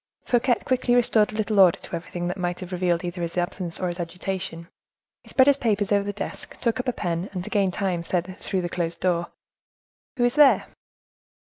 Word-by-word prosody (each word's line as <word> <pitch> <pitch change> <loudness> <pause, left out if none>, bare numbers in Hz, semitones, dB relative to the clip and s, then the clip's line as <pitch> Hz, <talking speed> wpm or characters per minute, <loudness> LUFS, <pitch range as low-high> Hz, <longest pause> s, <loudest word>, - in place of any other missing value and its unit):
Fouquet 245 0 +3
quickly 255 -1 +2
restored 225 -3 +3
a - - -8
little 215 -1 0
order 185 -3 +7
to - - -7
everything 175 +1 -4
that 180 - -2
might 180 -2 -2
have 185 0 -8
revealed 180 -1 0
either 175 0 -4
his 170 +1 -4
absence 175 -1 -2
or 185 - -1
his 175 0 -3
agitation: 175 0 -4 0.6
he - - -17
spread 260 - +5
his 280 0 +5
papers 210 -6 0
over 200 -1 +3
the 205 - -1
desk, 205 0 -7
took 235 0 0
up 255 - -3
a - - +3
pen, 175 -3 -3
and, 180 -2 -3
to - - -8
gain 200 -2 +2
time, 185 -2 -1
said, 180 +2 -2
through 190 -2 -2
the - - -1
closed 170 -1 -3
door,—"Who 180 - -5
is 245 0 +3
there?" 295 -2 +6
185 Hz, 210 wpm, -25 LUFS, 175-220 Hz, 0.6 s, order